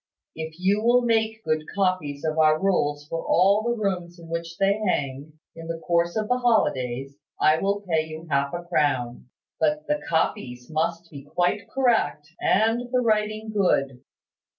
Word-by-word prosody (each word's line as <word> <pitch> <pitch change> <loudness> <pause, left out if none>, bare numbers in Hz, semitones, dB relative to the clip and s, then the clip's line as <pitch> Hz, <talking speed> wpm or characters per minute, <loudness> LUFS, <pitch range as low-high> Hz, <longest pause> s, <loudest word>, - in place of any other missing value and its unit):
If 160 0 -6
you 195 +3 +2
will 245 +1 +4
make 220 -1 0
good 155 0 0
copies 185 -7 -1
of 160 0 -1
our 155 0 +4
rules 145 -7 0
for 165 +1 -4
all 195 +4 +4
the 240 +1 -1
rooms 180 -4 -2
in 165 -1 -13
which 170 0 -4
they 195 0 +3
hang, 145 -5 -2 0.2
in 165 0 -9
the 165 0 -3
course 170 +1 0
of 215 -1 -1
the 250 +2 +1
holidays, 135 - 0 0.2
I 155 +1 +4
will 200 +1 0
pay 160 -5 0
you 160 +1 -8
half 140 -2 0
a 175 0 -5
crown. 130 -8 -1 0.3
But 300 0 +1
the 295 0 -1
copies 125 -5 -1
must 165 +2 -2
be 140 -3 -9
quite 180 +8 -1
correct, 230 - +1
and 225 +4 +2
the 255 - +2
writing 215 -1 0
good. 140 -10 +1
170 Hz, 170 wpm, -25 LUFS, 155-215 Hz, 0.3 s, will